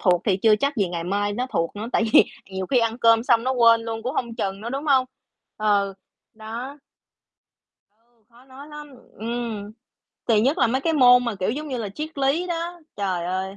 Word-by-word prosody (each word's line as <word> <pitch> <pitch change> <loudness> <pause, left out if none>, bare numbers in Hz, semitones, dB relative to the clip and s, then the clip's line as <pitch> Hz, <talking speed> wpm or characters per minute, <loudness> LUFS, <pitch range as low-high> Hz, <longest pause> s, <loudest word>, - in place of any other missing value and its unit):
thuộc 180 -3 +2
thì 195 -4 +2
chưa 215 +2 +4
chắc 280 +4 -1
gì 195 -4 +1
ngày 170 -1 -4
mai 205 +2 -1
nó 250 +4 -2
thuộc 165 +4 -1
nữa, 215 - -5
tại 225 - +2
vì - - +8 0.3
nhiều 190 0 -4
khi 255 +3 +2
ăn 230 +1 0
cơm 230 -1 +4
xong 235 -1 +2
nó 260 - +1
quên 230 -2 +5
luôn 225 -1 -5
cũng 255 +5 -3
hông 235 -2 -3
chừng 195 -3 -3
nữa, 235 +2 -6
đúng 275 +2 -4
hông? 265 -3 +4 0.5
Ừ, 205 -2 +1 0.4
đó. 235 +6 -7 1.5
Khó 240 +2 -20
nói 270 +2 -13
lắm, 300 -1 -10 0.2
ừm, 225 -2 -5 0.6
kỳ 225 -3 +4
nhất 270 +7 +1
là - - +4
mấy 260 +4 0
cái 325 +3 0
môn 250 -3 +6
mà, 235 -3 -2
kiểu 185 - +1
giống 300 +5 -5
như 255 -3 -3
là, 215 -3 -4
triết 300 +8 -7
lý 275 +6 +1
đó. 345 0 -4 0.2
Trời 185 -4 -2
ơi 190 +2 -3
230 Hz, 210 wpm, -23 LUFS, 205-265 Hz, 1.5 s, vì